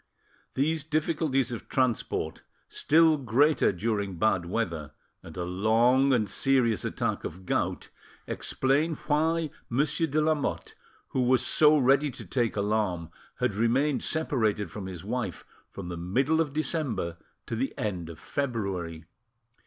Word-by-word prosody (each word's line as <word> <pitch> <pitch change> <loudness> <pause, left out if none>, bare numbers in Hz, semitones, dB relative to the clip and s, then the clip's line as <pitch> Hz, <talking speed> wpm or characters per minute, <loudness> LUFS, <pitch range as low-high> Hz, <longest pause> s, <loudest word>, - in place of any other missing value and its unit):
These 155 +3 +1
difficulties 150 -4 0
of 120 - -7
transport, 130 -4 -1 0.3
still 160 0 +4
greater 140 +4 +3
during 100 0 -2
bad 90 -3 +1
weather, 85 -8 -3 0.3
and 80 0 -11
a 90 - -2
long 115 +9 +3
and 115 -5 +2
serious 120 +1 +2
attack - - -2
of 90 +3 -7
gout, - - -1 0.4
explain 145 +5 0
why 160 +1 +1 0.2
Monsieur 150 +6 +1
ale 155 +1 +2
Lamotte, 155 -2 -1 0.4
who 130 - 0
was 125 0 +3
so 155 0 +5
ready 140 +2 +3
to 130 - -9
take 120 -4 0
alarm, 100 -5 -1 0.2
had - - 0
remained 125 +7 +1
separated 110 - 0
from 100 -3 -6
his 90 -4 -7
wife - - -4 0.2
from 95 -3 -8
the 85 - -5
middle 135 - +1
of 150 -3 -1
December 140 - -2 0.3
to 115 - -4
the 130 +4 -1
end 95 - -3
of 85 - -9
February. 95 - -3
120 Hz, 135 wpm, -28 LUFS, 100-150 Hz, 0.4 s, so